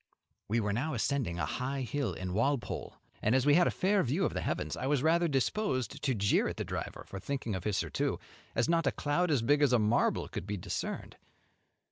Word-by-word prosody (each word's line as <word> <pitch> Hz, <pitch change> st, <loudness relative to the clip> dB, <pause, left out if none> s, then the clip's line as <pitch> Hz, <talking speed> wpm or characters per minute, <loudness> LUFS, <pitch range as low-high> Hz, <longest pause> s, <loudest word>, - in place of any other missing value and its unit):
We 115 Hz, +3 st, +1 dB
were 105 Hz, -2 st, 0 dB
now 140 Hz, +7 st, -1 dB
ascending 120 Hz, -7 st, 0 dB
a 80 Hz, -, 0 dB
high 130 Hz, -, -2 dB
hill 140 Hz, +2 st, -2 dB
in 90 Hz, -1 st, -4 dB
Walpole, 120 Hz, +5 st, -1 dB, 0.3 s
and 110 Hz, +4 st, +3 dB
as 130 Hz, 0 st, +3 dB
we 145 Hz, -, +6 dB
had 175 Hz, +3 st, +5 dB
a -, -, +3 dB
fair 195 Hz, +1 st, +2 dB
view 155 Hz, +9 st, +1 dB
of -, -, -1 dB
the -, -, -2 dB
heavens, -, -, -2 dB
I 130 Hz, -, -3 dB
was 145 Hz, -2 st, +2 dB
rather 170 Hz, +2 st, +4 dB
disposed 140 Hz, -, 0 dB
to 135 Hz, -3 st, +1 dB
jeer 100 Hz, -1 st, +2 dB
the -, -, -4 dB
driver -, -, -5 dB
for 95 Hz, -, -6 dB
thinking 130 Hz, 0 st, -3 dB
of 95 Hz, -2 st, -4 dB
his 105 Hz, -3 st, +1 dB
surtout, -, -, -1 dB, 0.4 s
as 115 Hz, -, +2 dB
not 165 Hz, 0 st, +2 dB
a -, -, +4 dB
cloud 160 Hz, +5 st, 0 dB
as 140 Hz, -7 st, +2 dB
big 145 Hz, +5 st, +3 dB
as 140 Hz, -4 st, +4 dB
a -, -, +6 dB
marble 110 Hz, +2 st, +2 dB
could 90 Hz, -, -6 dB
be 105 Hz, 0 st, -2 dB
discerned. 90 Hz, -, -4 dB
130 Hz, 220 wpm, -31 LUFS, 110-145 Hz, 0.4 s, we